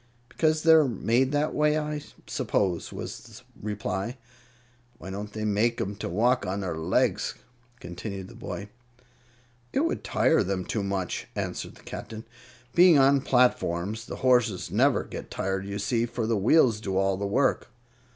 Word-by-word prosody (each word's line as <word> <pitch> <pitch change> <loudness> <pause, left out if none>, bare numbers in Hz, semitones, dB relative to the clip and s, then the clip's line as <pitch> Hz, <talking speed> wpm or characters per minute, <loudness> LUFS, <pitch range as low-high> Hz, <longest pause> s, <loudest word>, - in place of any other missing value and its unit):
"Because 155 +1 +1
they're 160 -3 +6
made 120 +3 +1
that 145 +1 0
way, 150 0 +2
I 150 -1 -3 0.2
suppose," 90 -4 -1
was - - -6
the - - -14 0.2
reply. 105 +3 -3 0.8
"Why 95 - -8
don't 105 +2 -6
they 110 0 -4
make 110 +3 +1
'em 100 +1 -2
to - - -4
walk 120 +8 +2
on 95 +2 -2
their 90 -4 -3
legs?" 80 0 0 0.4
continued 95 +2 -7
the 115 - -13
boy. 105 -3 -7 1.0
"It 275 - +1
would 330 +3 -1
tire 160 - +3
them 95 -2 -2
too 110 - -2
much," 95 -2 -3
answered - - -4
the - - -18
Captain. 110 +1 -8 0.5
"Being 175 -3 +7
on 135 0 +5
platforms, 110 -5 +1
the - - -5
horses 120 -7 +2
never - - +3
get - - -8
tired, 95 0 -2
you 100 0 -4
see, 115 +3 0
for 115 -1 -3
the 115 +1 +1
wheels 115 +2 +4
do 95 -3 -2
all 95 0 +2
the 100 +1 -3
work." 130 +6 +1
110 Hz, 160 wpm, -27 LUFS, 95-130 Hz, 1.0 s, Being